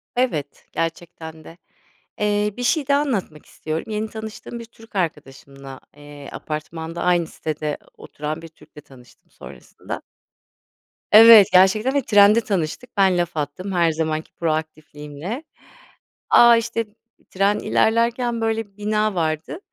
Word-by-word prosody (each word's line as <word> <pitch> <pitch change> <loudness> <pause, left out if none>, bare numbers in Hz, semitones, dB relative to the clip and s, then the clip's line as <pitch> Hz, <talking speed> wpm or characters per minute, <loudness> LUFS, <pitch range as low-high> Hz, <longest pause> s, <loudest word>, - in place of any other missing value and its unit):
Evet 160 - -2
gerçekten 165 -1 -5
de, 165 - -13 0.6
eee, 210 0 0
bir 245 - -4
şey 285 +2 +1
daha 280 0 +3
anlatmak 195 - -3
istiyorum. 155 +1 -5
Yeni 215 +1 -3
tanıştığım 220 +2 -8
bir 230 - -9
Türk 225 -1 -19
arkadaşımla, 140 -5 -5 0.2
eee, 145 -1 -11
apartmanda 160 +2 -6
aynı 175 -2 +2
sitede 155 -1 -4 0.2
oturan 155 +2 -6
bir 165 - -10
Türk'le 150 -2 -17
tanıştım 125 -3 -19
sonrasında. - - -10 1.1
Evet, 220 -2 +10
gerçekten 200 +8 +4
ve 280 - +2
trende 210 0 +5
tanıştık. 200 +5 -4
Ben 190 -2 +4
laf 175 -2 -2
attım 150 +7 -4
her 170 -2 +2
zamanki 155 0 -3
proaktifliğimle. 155 - -5 0.9
A, 235 -1 +7
işte 230 0 -2 0.4
tren 200 +2 +1
ilerlerken 235 +1 +1
böyle 225 0 -1
bir 200 0 -34
bina 210 -1 0
vardı. 160 - -2
185 Hz, 130 wpm, -21 LUFS, 155-220 Hz, 1.1 s, Evet